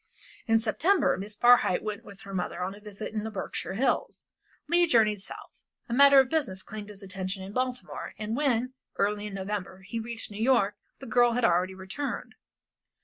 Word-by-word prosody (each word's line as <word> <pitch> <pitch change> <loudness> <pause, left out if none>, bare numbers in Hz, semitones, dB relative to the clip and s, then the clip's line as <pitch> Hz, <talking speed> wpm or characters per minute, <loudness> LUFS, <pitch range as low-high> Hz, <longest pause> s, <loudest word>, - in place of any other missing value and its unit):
In 225 0 +4
September 290 - +2
Miss 205 +3 -6
Barhyte 240 -5 +5
went 210 -1 -4
with 200 +1 -13
her 200 -3 -9
mother 180 -1 -2
on 190 +2 -3
a 205 - -12
visit 210 +1 -7
in 215 -1 -2
the 220 - -3
Berkshire 195 -2 -4
Hills. 260 +6 0 0.4
Leigh 345 +2 +4
journeyed 215 -7 +3
South. - - -10 0.3
A 235 - -4
matter 280 +1 +8
of 265 - +5
business 255 -11 -1
claimed 215 -2 -8
his 200 -1 -11
attention 190 0 -4
in 195 +2 -8
Baltimore, 255 0 -3
and 215 +1 -3
when, 255 -3 +1 0.2
early 205 +1 0
in 200 - -7
November, 190 -1 -4
he 230 +4 -4
reached 225 -1 -6
New 205 +1 -6
York 230 -5 +3 0.2
the 270 - -10
girl 240 0 +4
had 245 0 +2
already 180 +1 +2
returned. 190 +10 -5
215 Hz, 190 wpm, -28 LUFS, 195-245 Hz, 0.4 s, matter